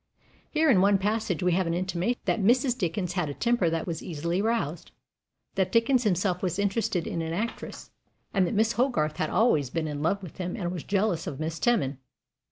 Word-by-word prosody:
Here 315 +1 +2
in 190 -6 +5
one 200 +1 +5
passage 205 -2 -1
we 180 - +3
have 180 0 +1
an 165 - 0
intimation 185 +6 -1
that 225 - +1
Mrs. 245 +4 +3
Dickens 180 -3 -2
had 175 -5 -1
a 145 - -5
temper 235 -7 +2
that 165 0 -2
was 165 -3 -4
easily 170 +2 -2
roused, 210 -8 -1 0.6
that 190 -1 0
Dickens 235 +2 +3
himself 185 -2 +1
was 180 -1 -1
interested 200 -2 0
in 165 - -3
an 165 0 -3
actress, 220 +6 -5 0.4
and 190 -3 +3
that 225 - -2
Miss 220 +2 +3
Hogarth 195 - 0
"had 155 - -1
always 155 - +2
been 160 +3 -2
in 145 -1 -4
love 195 +5 0
with 175 - -10
him, 180 -1 -3
and 175 -6 -3
was 180 -4 -5
jealous 195 -4 0
of 140 - -5
Miss 160 +1 -3
Teman." 145 - +1
185 Hz, 205 wpm, -27 LUFS, 165-220 Hz, 0.6 s, in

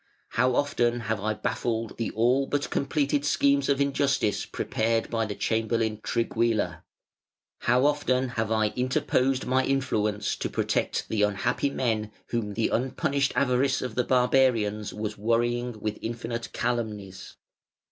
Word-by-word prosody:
How 125 0 +2
often 120 -4 +1
have 110 -2 -2
I 110 +1 -1
baffled 115 -1 -2
the 115 - -1
all 125 +5 +3
but 145 -1 -2
completed 145 0 0
schemes 140 -1 +2
of 140 -1 +2
injustice 140 -5 +1
prepared 115 +1 -1
by 115 -2 0
the 105 - -4
chamberlain 110 -1 0
Trigguilla! 115 -1 0 0.8
How 125 +3 +3
often 130 -3 +1
have 110 -3 -2
I 110 -1 +2
interposed 130 +2 0
my 130 +1 +2
influence 105 -7 0
to - - -3
protect - - -1
the 110 - 0
unhappy 105 +7 +1
men 110 -6 -1 0.2
whom 105 -4 -2
the 115 - +1
unpunished 140 +3 0
avarice 135 0 +2
of 125 -3 -4
the 125 - +1
barbarians 125 -5 +2
was 105 -1 -5
worrying 120 +1 0
with 105 0 -3
infinite 115 +1 -4
calumnies! 105 -6 -3
120 Hz, 135 wpm, -27 LUFS, 110-130 Hz, 0.8 s, all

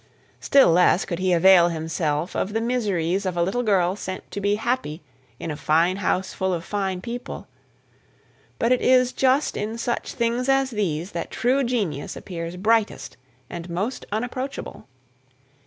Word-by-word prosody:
Still 275 -10 +5
less 180 +1 +4
could 170 -2 -4
he 185 0 +1
avail 175 0 +6
himself 160 0 -2
of 205 - -1
the 225 - +1
miseries 200 -7 0
of 185 -2 -3
a 170 - +3
little 195 +8 0
girl 190 -5 +2
sent 185 -2 -7
to 200 - -4
be 200 +1 +2
happy 220 - -2 0.4
in 165 - -4
a - - -4
fine 165 +5 +2
house 190 -1 -1
full 190 -1 -1
of 170 0 -6
fine 190 -3 -2
people; 240 +4 -6 1.1
but 230 - +1
it 255 - +3
is 255 -1 +4
just 265 +2 +2
in 220 +2 -3
such 240 +1 -3
things 235 +3 -1
as 270 -1 +2
these 185 -4 -2
that 170 - -4
true 260 +3 +1
genius 205 - -2
appears 170 -1 -6
brightest 220 +2 0 0.3
and 175 +3 -7
most 200 +9 -3
unapproachable. 245 - -4
195 Hz, 160 wpm, -23 LUFS, 175-235 Hz, 1.1 s, avail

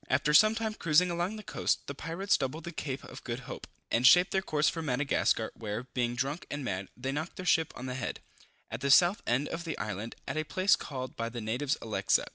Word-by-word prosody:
After 145 +3 +2
some 215 +7 +7
time 220 -1 -2
cruising 170 -1 +3
along 175 +5 -1
the 215 - -8
coast, - - -1
the 140 - -5
pirates 165 +7 0
doubled 140 +4 -3
the 170 - -6
Cape 140 -4 -4
of - - -10
Good 120 +1 -4
Hope, 125 - -8 0.2
and 120 +2 +5
shaped 180 +4 +7
their 190 - +2
course 150 -5 +1
for 165 - 0
Madagascar, 135 -5 +1
where, 110 +1 -4
being 120 -1 -2
drunk 135 +6 -2
and 145 -2 -4
mad, 95 -3 -3
they 130 +2 -3
knocked 155 +4 -4
their 185 - -7
ship 160 -3 +3
on 125 - -7
the 130 - -3
head, 130 -1 -4 0.5
at 115 +2 -5
the 140 - 0
south 175 +8 +6
end 130 +5 +1
of 165 +1 -4
the 165 -2 -4
island, 105 +2 -4
at - - -3
a 155 - +1
place 185 +5 +3
called 130 -3 -6
by 115 0 -3
the 120 +1 -6
natives 125 +7 -1
Elexa. 110 -2 +1
140 Hz, 235 wpm, -30 LUFS, 125-170 Hz, 0.5 s, some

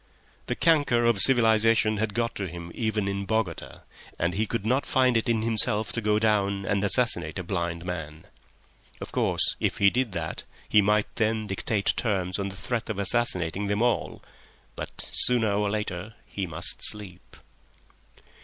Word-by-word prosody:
The - - -2
canker 145 -8 +2
of 115 -4 +3
civilisation 110 -1 +4
had 105 -1 -3
got 115 0 -1
to 100 - -4
him 85 0 -9
even 110 -3 -2
in 100 0 -3
Bogota, 110 -7 -3 0.4
and 85 +1 -1
he 110 +4 -1
could 115 -2 -4
not 130 +5 +1
find 130 -2 +2
it 115 +2 0
in 115 -2 +1
himself 110 -1 +2
to 115 - -3
go 105 -1 +1
down 100 -2 0
and 100 0 -1
assassinate 120 +2 +2
a 90 - -4
blind 85 -2 -4
man. 80 -3 -6 0.7
Of - - -8
course, - - 0
if - - -1
he 100 -1 +4
did 125 -3 -1
that, - - -4 0.2
he 105 - +4
might 105 +1 0
then 110 -1 0
dictate 100 +1 -1
terms 95 -4 -2
on 100 0 -2
the 95 - -10
threat 115 +4 -4
of 110 - -3
assassinating 100 -3 0
them 105 +3 0
all. 120 -1 -1 0.5
But—Sooner 115 -4 +2
or 105 0 0
later 105 -1 -4
he 95 -2 -5
must - - 0
sleep! 95 -4 0
105 Hz, 165 wpm, -26 LUFS, 95-115 Hz, 0.7 s, civilisation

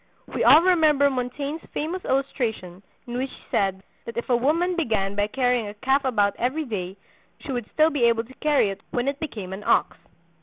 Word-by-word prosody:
We - - 0
all 320 - +8
remember 310 -6 +4
Montaigne's 275 +5 -3
famous 345 +5 -3
illustration 230 -9 -2 0.2
in 245 0 -4
which 265 +1 -2
he - - -15
said 195 -1 0 0.2
that 230 - -8
if 235 - -4
a - - +5
woman 330 +9 +1
began 220 - 0
by 205 0 +1
carrying 245 -1 0
a 205 - -8
calf 265 +6 +1
about 205 -6 +2
every 280 +6 -1
day 195 -5 -5 0.4
she - - -6
would 245 -4 -4
still 315 +1 +3
be 275 -6 +2
able 230 -1 +3
to 250 +3 -15
carry 290 -9 +3
it 195 - -9
when 245 +1 -2
it 280 +1 -1
became 210 - -6
an 200 +2 -7
ox. - - +2
250 Hz, 200 wpm, -24 LUFS, 210-290 Hz, 0.4 s, all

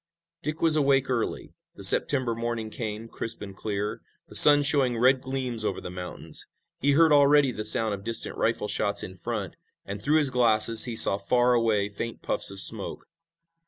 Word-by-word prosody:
Dick 155 +3 -7
was 160 -2 +4
awake 135 -3 0
early. 120 -3 -5 0.2
The - - -13
September 130 -4 +4
morning 115 -1 -6
came, 110 -2 -8
crisp 115 0 -4
and 100 -1 -11
clear, 105 0 -6 0.3
the - - -17
sun 145 -1 +8
showing 140 -5 -1
red 130 +2 +1
gleams 130 -4 -6
over 100 - -4
the 90 - -10
mountains. 90 -1 -7 0.3
He 140 +1 0
heard 160 +1 +2
already 145 -1 +2
the 110 -2 -7
sound 110 0 +3
of 100 -1 -9
distant 115 +1 -2
rifle 115 -2 -3
shots 100 -1 -1
in 95 - -10
front, 90 - -7 0.3
and, 100 +1 -9
through 150 +8 0
his 145 -4 0
glasses, 115 -2 +4
he 120 -2 -7
saw 100 -2 +4
far 125 +4 0
away 110 -4 -1
faint 110 +3 -9
puffs - - +2
of 100 0 -4
smoke. 90 - 0
115 Hz, 185 wpm, -24 LUFS, 105-135 Hz, 0.3 s, sun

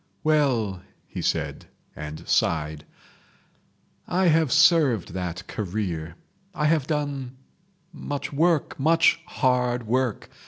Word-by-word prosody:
"Well", 125 -11 +1 0.2
he - - -6
said - - -2 0.3
and 75 0 -8
sighed, 75 -2 0 1.2
"I 180 0 +2
have 160 -4 +3
served 155 - +4
that 90 -1 -4
career. 90 -6 -4 0.4
I 150 - 0
have 150 -3 +2
done—much 145 +3 -6
work, 160 0 +1
much 165 +3 +4
hard 125 -5 0
work. 125 -1 -1
130 Hz, 95 wpm, -25 LUFS, 100-155 Hz, 1.2 s, served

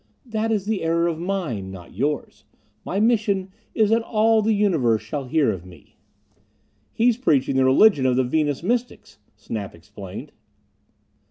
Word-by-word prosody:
"That 225 -1 -2
is 205 -3 0
the 215 -1 -1
error 165 +1 +1
of 165 -2 -2
mine, 165 - -3
not 90 -3 -11
yours. 140 +6 -3 0.4
My 195 - -2
mission 205 -4 +1 0.2
is 215 -1 +3
that 230 +1 +3
all 225 0 +2
the 215 +1 +1
universe 145 - +1
shall 135 +6 -5
hear 140 -1 +2
of 95 -4 -6
me." 90 -5 -17 1.0
"He's 235 0 +2
preaching 145 - +1
the 130 0 +3
religion 135 +1 +5
of 125 - +2
the 130 - +2
Venus 145 +2 -1
Mystics," 230 - -3 0.2
Snap 105 -2 -6
explained. 95 +2 -10
160 Hz, 155 wpm, -23 LUFS, -, 1.0 s, religion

